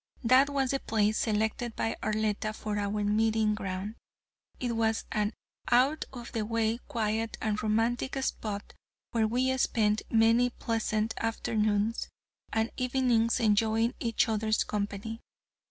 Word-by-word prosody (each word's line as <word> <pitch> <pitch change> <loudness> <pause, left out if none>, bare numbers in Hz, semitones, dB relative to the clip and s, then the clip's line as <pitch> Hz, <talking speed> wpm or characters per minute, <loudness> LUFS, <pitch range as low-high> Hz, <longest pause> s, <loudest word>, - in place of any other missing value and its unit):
That 255 +4 +5
was 275 -2 0
the 275 - 0
place 215 -2 +1
selected 220 +2 -1
by 225 - -1
Arletta 215 0 -1
for 210 -1 -3
our 205 +1 -1
meeting 215 +1 +2
ground. 195 +1 -4 0.6
It 240 -2 -1
was 225 -1 +1
an 210 -1 0 0.4
out 265 +6 +3
of 240 -3 -8
the 225 -3 -1
way, 225 +1 0
quiet 220 0 -1
and 210 -1 -1
romantic 230 +5 0
spot 205 -5 -4 0.4
where 225 -2 +2
we 255 +3 +1
spent 215 -3 +2
many 230 +2 +4
pleasant 225 -2 -1
afternoons 220 -1 0 0.4
and 225 +1 0
evenings 250 -3 +2
enjoying 225 +1 +2
each 230 -1 +1
other's 215 0 +1
company. 210 +2 -4
225 Hz, 130 wpm, -29 LUFS, 215-235 Hz, 0.6 s, That